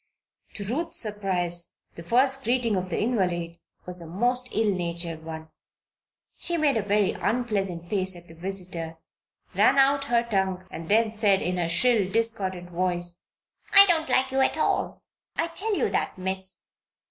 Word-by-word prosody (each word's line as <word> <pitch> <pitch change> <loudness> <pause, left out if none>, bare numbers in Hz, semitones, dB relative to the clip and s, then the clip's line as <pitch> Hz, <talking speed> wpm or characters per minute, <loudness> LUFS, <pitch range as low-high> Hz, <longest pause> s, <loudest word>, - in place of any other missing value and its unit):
To 205 - -4
Ruth's 330 - -2
surprise 180 -5 -1 0.2
the - - -9
first 265 +9 +2
greeting 240 -3 +1
of 185 0 -2
the 170 - -2
invalid 180 -7 -1 0.3
was 180 -1 -3
a 165 - -9
most 245 +8 0
ill 215 -1 +1
natured 170 -2 -3
one. 160 0 -8 0.9
She 345 0 -1
made 300 -4 +2
a 220 - +1
very 205 -1 +2
unpleasant 200 -7 -2
face 190 -1 0
at 175 0 -13
the 165 - -13
visitor, 175 -2 -4 0.6
ran - - +4
out 275 +1 +4
her 235 -4 +2
tongue, 190 -5 -1
and 165 +1 -8
then 220 +1 +3
said, 205 -3 +2
in 180 +1 -1
her 170 -2 -1
shrill, 200 +2 +2
discordant 190 -6 -1
voice: 175 0 -2 0.6
"I 395 0 +11
don't 325 -4 +1
like 265 +1 +2
you 265 - 0
at 265 - +2
all - - 0 0.3
I 330 +1 -1
tell 405 +5 -1
you - - +2
that, - - -1
Miss!" 190 0 -4
195 Hz, 165 wpm, -26 LUFS, 175-245 Hz, 0.9 s, I